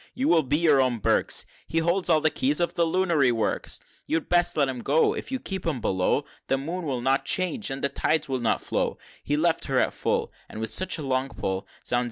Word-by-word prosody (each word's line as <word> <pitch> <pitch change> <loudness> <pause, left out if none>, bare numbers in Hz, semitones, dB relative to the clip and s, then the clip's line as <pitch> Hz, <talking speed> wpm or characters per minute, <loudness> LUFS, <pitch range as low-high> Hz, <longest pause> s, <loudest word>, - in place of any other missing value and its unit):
You 265 +3 0
will 170 -2 +5
be 145 +1 0
your 155 -5 +4
own 125 -2 +1
Burkes 110 - +1 0.2
He 165 - -3
holds 175 +3 +1
all 155 -2 +4
the 155 0 +2
keys 145 +4 +1
of 175 - 0
the 170 -1 +1
lunary 165 -7 +2
works!" 115 -3 -1
XLI. - - -26
"You'd 160 0 -1
best 175 -2 +3
let 140 -2 +3
him 130 -2 -4
go 150 +6 +3
If - - -6
you 265 - 0
keep 190 -5 -4
him 155 -6 -1
below, 95 +8 0 0.2
The 135 - +1
Moon 165 +6 -4
will 130 -3 -2
not 135 +2 +2
change, 185 - 0
and 135 0 -5
the 140 - +2
tides 155 +2 0
will 130 -2 -2
not 120 - +1
flow; - - -1 0.3
He 145 - 0
left 165 +1 +1
her 135 -2 0
at - - +2
full, - - -1 0.2
And - - -8
with 110 0 -3
such 185 +11 +1
a 155 - -6
long 130 0 0
pull, 95 -5 -4 0.2
Zounds! 120 - +2
145 Hz, 245 wpm, -26 LUFS, 130-170 Hz, 0.3 s, will